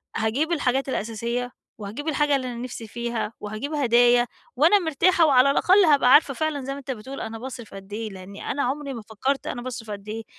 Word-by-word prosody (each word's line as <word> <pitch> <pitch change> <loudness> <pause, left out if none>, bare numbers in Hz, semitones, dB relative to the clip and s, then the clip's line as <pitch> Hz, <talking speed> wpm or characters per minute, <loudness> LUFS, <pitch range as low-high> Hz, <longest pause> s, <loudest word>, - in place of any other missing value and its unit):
هاجيب 255 +10 0
الحاجات 270 -4 0
الأساسية، 235 +2 -3 0.3
وهاجيب 220 +9 -7
الحاجة 295 -2 +2
اللي 260 -2 -2
أنا 245 - -5
نفسي 235 -1 -6
فيها، 235 -1 -3
وهاجيب 215 +9 -5
هدايا، 245 -3 +4 0.3
وأنا 330 +10 +5
مرتاحة 335 +1 +3
وعلى 275 -2 +5
الأقل 375 +7 +5
هابقى 280 -5 +5
عارفة 290 -2 +6
فعلًا 310 0 -2
زي 275 - -3
ما 280 - -7
أنت 275 -1 -6
بتقول 260 +3 -7
أنا 225 0 -6
باصرف 240 -2 -8
قد 195 +1 -10
إيه، 220 +1 -4
لأنّي 195 0 -7
أنا 280 - -1
عمري 280 +2 -2
ما 235 - -6
فكرت 225 +6 -2
أنا 240 - -4
باصرف 240 -3 -6
قد 200 0 -8
إيه. 225 +1 -5
250 Hz, 200 wpm, -24 LUFS, 225-285 Hz, 0.3 s, عارفة